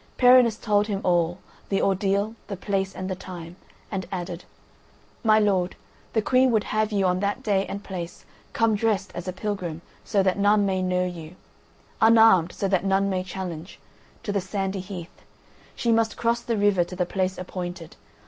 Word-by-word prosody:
Perinis 245 -3 +6
told 210 -2 +1
him 200 -3 -2
all: 175 -1 +2 0.3
the 195 - +1
ordeal, 200 +2 +1
the 200 - -5
place, 195 0 -2
and 185 - -4
the 190 - -2
time, 175 -2 -9 0.4
and 190 -2 -3
added: 175 -2 -5 0.8
"My 215 -1 +5
lord, 195 -4 +2 0.4
the 220 - +1
Queen 255 +2 +4
would 220 -3 +2
have 215 0 0
you 200 -2 +1
on 180 0 +2
that 200 +1 -2
day 195 -2 +1
and 200 +1 -6
place 175 -3 -7 0.3
come 225 -1 +2
dressed 205 -2 0
as 175 +1 -6
a - - -1
pilgrim, 185 -4 -4 0.2
so 200 -3 +1
that 190 +1 +1
none 205 0 +4
may 190 -1 0
know 180 0 +1
you—unarmed, 180 +3 +1
so 200 - -2
that 190 -2 +1
none 195 0 +2
may 185 -1 -1
challenge 180 -2 -7 0.4
—to 205 - -2
the 200 -1 0
Sandy 195 +1 -3
Heath. 180 -2 -8 0.5
She 235 - 0
must 225 -1 +2
cross 235 0 +1
the 235 -1 -2
river 200 -3 +3
to 180 +1 -8
the 180 -1 0
place 185 +1 -1
appointed. 175 -2 -6
195 Hz, 175 wpm, -25 LUFS, 180-210 Hz, 0.8 s, Perinis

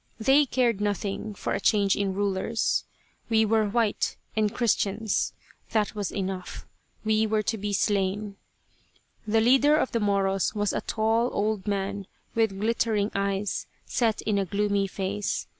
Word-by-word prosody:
They 270 +6 +4
cared 235 -5 +1
nothing 205 0 -2
for - - -3
a - - 0
change 200 -1 +3
in 195 -2 -1
rulers. 205 +3 0 0.4
We 220 -1 +4
were 215 -1 +2
white, 220 -1 0 0.2
and 215 -1 +2
Christians; 220 -3 0 0.4
that 215 -2 +1
was 205 -3 -3
enough. 190 -2 -4 0.4
We 220 0 +2
were 215 0 +1
to 220 +2 -1
be 205 +1 -2
slain. 200 0 0 0.9
The 220 +1 +3
leader 270 +6 +5
of 260 - 0
the 230 - 0
Moros 195 -1 +1
was 205 -1 0
a - - -1
tall 225 +2 +1
old 210 -1 -1
man 200 -1 -2 0.3
with 220 -4 +1
glittering 220 -1 +1
eyes 200 0 -1 0.2
set 225 -3 0
in 210 -2 +1
a 195 - 0
gloomy 200 +1 0
face. 195 +1 -2
210 Hz, 150 wpm, -26 LUFS, 200-220 Hz, 0.9 s, leader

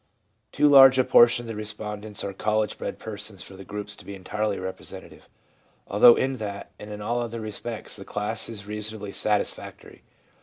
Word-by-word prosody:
Too 150 - +3
large 135 -2 +8
a 130 - +5
portion 120 0 +5
of - - -10
the 115 - -5
respondents 105 0 -4
are 100 - -4
college 105 +2 0
bred - - -4
persons 105 -3 -6
for 95 - -12
the 95 - -10
groups 105 +1 -4
to - - -13
be 100 - -8
entirely 105 +2 -2
representative; 95 0 -8 0.6
although 115 +4 +7
in 135 0 -1
that 100 -2 -6
and 105 - -9
in 105 0 -7
all 120 +3 -1
other 115 -1 -4
respects 110 +1 -5
the 95 - -8
class 105 +3 -2
is 105 -3 -7
reasonably 105 0 -5
satisfactory. 105 +1 -2
105 Hz, 180 wpm, -25 LUFS, 100-115 Hz, 0.6 s, large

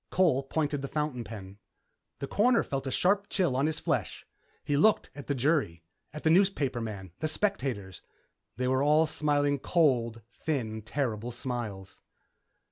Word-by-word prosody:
Cole 170 -8 +3
pointed 145 +1 -1
the 140 - -3
fountain 150 -5 -2
pen. 100 -2 -9 0.6
The 140 - -5
Coroner 235 - +3
felt 135 0 -3
a - - -2
sharp 200 +7 +2
chill 175 -10 +1
on 135 +3 +2
his 155 -1 -2
flesh. - - -2 0.4
He 145 - 0
looked 210 +10 +3
at 145 - -10
the 140 - 0
jury, 130 - +1 0.3
at 150 +1 -8
the 160 - +4
newspaperman, 120 - +1
the 155 - 0
spectators. 135 - -2 0.6
They 125 0 0
were 130 +1 +2
all 150 +3 +4
smiling 145 -2 +1
cold, 120 -9 +1 0.2
thin, 115 -8 -2
terrible 115 -1 -2
smiles.... 115 -6 -5
140 Hz, 150 wpm, -29 LUFS, 115-155 Hz, 0.6 s, the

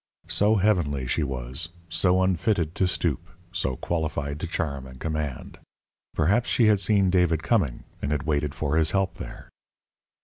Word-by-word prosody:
So 105 +2 +3
heavenly 85 -10 +1
she 65 - 0
was, 65 +3 -3 0.2
so 90 +3 +2
unfitted 90 -2 +1
to 95 - +1
stoop, 85 -6 0 0.3
so 65 - -1
qualified 75 -3 -2
to 85 - -3
charm 70 -6 -3
and 65 0 -12
command! 75 -5 -4 0.6
Perhaps 100 +10 +2
she 120 - +4
had 105 -2 +5
seen 100 -1 +3
David 90 -3 +2
coming, 90 - +1 0.2
and 70 - -2
had 75 -1 0
waited 75 -2 -1
for 75 +1 0
his 80 -1 +4
help 95 -1 -1
there. - - -9
80 Hz, 160 wpm, -26 LUFS, 70-95 Hz, 0.6 s, had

